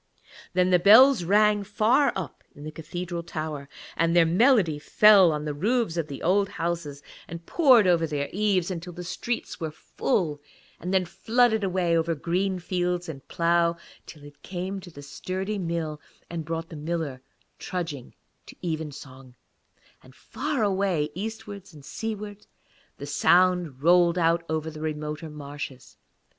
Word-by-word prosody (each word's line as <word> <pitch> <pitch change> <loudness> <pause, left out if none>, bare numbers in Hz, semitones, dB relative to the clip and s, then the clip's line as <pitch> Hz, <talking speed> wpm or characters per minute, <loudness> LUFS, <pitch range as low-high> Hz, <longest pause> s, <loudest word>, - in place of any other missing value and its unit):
Then 180 0 +2
the 180 - +5
bells 225 +4 +7
rang, 210 +3 +3
far 220 +8 +2
up 185 -6 -6
in 145 - -11
a 155 - -6
cathedral 175 +2 -5
tower, 155 -4 -6 0.3
and 165 +1 +1
their 170 -1 +6
melody 180 - +3
fell 195 +2 +6
on 150 0 -3
the 150 - -2
roofs 215 - 0
of 165 -3 -2
the 140 -3 -8
old 195 +3 +2
houses 165 -4 -4 0.2
and 170 0 -9
poured 260 - +5
over 170 -2 +3
their 145 -2 -2
eaves 195 -3 +1
until 175 0 -6
the 180 +1 -7
streets 230 +6 -4
were 160 -2 -3
full, 155 - -2 0.4
and 180 - -5
then 190 -1 +2
flooded 220 +5 +1
away 180 -3 +1
over 165 0 +1
green 185 +5 -1
fields 180 0 -2
and 140 -5 -9
plough, 170 0 +1 0.3
till 150 -3 -12
it 145 0 -15
came 190 +2 -5
to 185 -1 -12
the 145 -4 -12
sturdy 185 +8 -4
mill 165 -4 -3 0.3
and 165 -2 -4
brought 165 +1 -4
the 165 - -9
miller 155 -4 -4 0.4
trudging 165 -8 -5 0.3
to - - -12
evensong, 140 -5 -6 0.7
and 130 0 -18
far 285 -4 -3
away 190 -7 0
eastwards 205 -2 -7
and 145 -2 -14
seawards 210 0 -6 0.5
the 140 - -7
sound 170 -1 +2
rang 175 +1 +4
out 170 0 +2
over 160 0 -2
the 155 0 -10
remoter 150 0 -4
marshes. 140 -3 -8
170 Hz, 155 wpm, -26 LUFS, 155-195 Hz, 0.7 s, bells